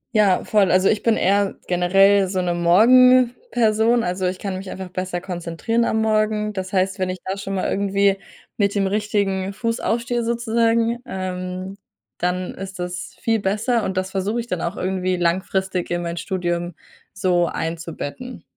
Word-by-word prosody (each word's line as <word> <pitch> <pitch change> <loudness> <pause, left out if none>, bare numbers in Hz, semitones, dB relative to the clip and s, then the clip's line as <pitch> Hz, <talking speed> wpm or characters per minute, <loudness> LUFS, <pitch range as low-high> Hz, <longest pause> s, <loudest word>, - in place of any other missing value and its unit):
Ja, 205 -4 +4
voll. 205 -4 +3
Also, 185 +1 +4
ich 210 - +1
bin 230 -1 +2
eher 200 +1 +2
generell 195 +2 +4
so 185 0 -2
'ne 175 -1 0
Morgenperson. 235 - +4
Also, 180 +1 -1
ich 180 +1 -2
kann 195 -1 -4
mich 190 0 -7
einfach 190 -1 -7
besser 185 -1 -4
konzentrieren 180 +6 -2
am 220 - 0
Morgen. 215 -1 +1
Das 190 -1 -5
heißt, 190 0 0
wenn 185 - 0
ich 185 - -3
da 190 +1 -2
schon 195 0 -5
mal 185 - -1
irgendwie 200 0 +1 0.4
mit 200 -1 +1
dem 195 -1 +2
richtigen 200 -1 -1
Fuß 230 +2 -2
aufstehe, 235 +1 -1
sozusagen, 230 0 +1
ähm, 185 -1 -5 0.4
dann 180 +1 -1
ist 190 0 -8
das 180 +1 -5
viel 225 -1 +1
besser 215 +4 0
und 190 -2 -3
das 185 0 -1
versuche 200 +5 -1
ich 235 - -3
dann 180 -8 -3
auch 170 - -3
irgendwie 185 0 -1
langfristig 185 +1 -1
in 175 0 -1
mein 170 0 -4
Studium 175 -1 -2 0.4
so 180 -3 +1
einzubetten. 165 - -5
190 Hz, 170 wpm, -21 LUFS, 180-215 Hz, 0.4 s, Ja